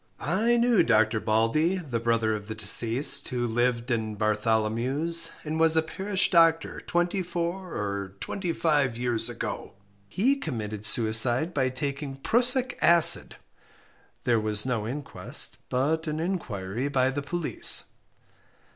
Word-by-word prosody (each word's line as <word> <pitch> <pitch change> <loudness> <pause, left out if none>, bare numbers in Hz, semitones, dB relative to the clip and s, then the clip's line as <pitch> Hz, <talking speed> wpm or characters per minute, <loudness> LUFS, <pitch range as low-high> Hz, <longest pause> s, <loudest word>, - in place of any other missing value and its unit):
I 220 - 0
knew 235 -2 +3
Dr. 110 -6 +2
Baldey, 115 - +1
the 135 -10 -4
brother 115 -1 0
of 105 -1 -6
the 110 - -6
deceased, 120 +5 +1
who 125 -1 -2
lived 120 +1 -1
in 110 -2 -2
Bartholomews, 115 +9 0
and 155 +1 -4
was 160 0 +3
a 160 - +3
parish 190 +4 0
doctor 165 -2 +2
twenty 175 +2 -1
four 175 +1 -5
or 100 -2 -4
twenty 180 - -4
five 145 -8 0
years 120 -1 -2
ago. 120 - -6 0.3
He 255 - +1
committed 110 - -4
suicide 120 +8 +2
by 130 -3 0
taking 140 +1 -5
prussic 245 - +1
acid. 170 -1 +7 0.9
There 120 -2 +1
was 105 0 -1
no 115 -5 -2
inquest, 140 +4 -4
but 155 +6 -1
an 155 0 -3
inquiry 125 - -4
by 130 -2 +1
the 145 +2 -4
police. 165 +3 0
135 Hz, 135 wpm, -26 LUFS, 115-170 Hz, 0.9 s, acid